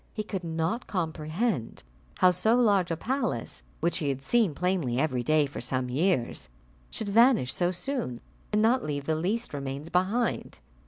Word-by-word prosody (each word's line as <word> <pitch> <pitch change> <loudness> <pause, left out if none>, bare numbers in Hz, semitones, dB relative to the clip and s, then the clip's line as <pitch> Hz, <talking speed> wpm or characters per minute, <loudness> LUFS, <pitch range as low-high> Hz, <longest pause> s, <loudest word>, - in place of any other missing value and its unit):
He 215 - -2
could 195 -3 -5
not 165 +7 -2
comprehend 160 - -2 0.3
how 185 0 +6
so 220 +6 +2
large 205 -7 +3
a 165 - -1
palace 225 - -2 0.2
which 170 +2 +1
he 145 - -1
had 135 0 -3
seen 215 - +2
plainly 175 -9 0
every 130 -3 +1
day 155 +4 +3
for 140 - -7
some 130 +1 -2
years, 140 -2 0 0.4
should 215 - -5
vanish 230 - +4
so 175 -1 +1
soon, 185 - -3 0.3
and 210 0 +2
not 245 +3 +3
leave 145 -2 -3
the 160 - +1
least 200 +8 -2
remains 140 +2 -5
behind. 195 +8 0
175 Hz, 165 wpm, -28 LUFS, 140-215 Hz, 0.4 s, how